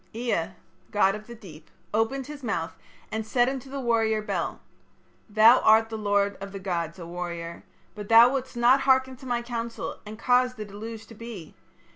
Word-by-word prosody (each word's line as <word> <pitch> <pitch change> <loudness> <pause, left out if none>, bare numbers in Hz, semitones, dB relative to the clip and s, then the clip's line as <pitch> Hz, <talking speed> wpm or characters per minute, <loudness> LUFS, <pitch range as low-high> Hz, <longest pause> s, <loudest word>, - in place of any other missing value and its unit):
"Ea, 230 -8 -1 0.4
god 200 -2 +3
of 215 +1 -8
the 235 - -9
deep, 165 -8 -14 0.2
opened 225 +5 0
his 295 0 -9
mouth 205 -9 -3 0.4
and 220 0 -2
said 240 +3 +2
unto 265 0 -4
the 275 +1 -5
warrior 225 -3 +1
Bel: 215 - -3 0.7
'Thou 220 +4 +7
art 220 +1 +5
the 225 - -5
lord 205 -1 +1
of 195 0 -6
the 195 - -5
gods, 170 -3 -3
O 170 - -8
warrior. 170 -1 -6 0.3
But 210 -1 -8
thou 230 +2 +8
wouldst 260 -2 -4
not 250 +3 +5
hearken 260 -1 +3
to 260 - -11
my 240 -1 -1
counsel 235 -1 -5
and 215 +1 -9
caused 250 +1 +2
the 215 - -5
deluge 220 +2 -8
to - - -13
be. 220 -7 -9
225 Hz, 185 wpm, -26 LUFS, 200-245 Hz, 0.7 s, thou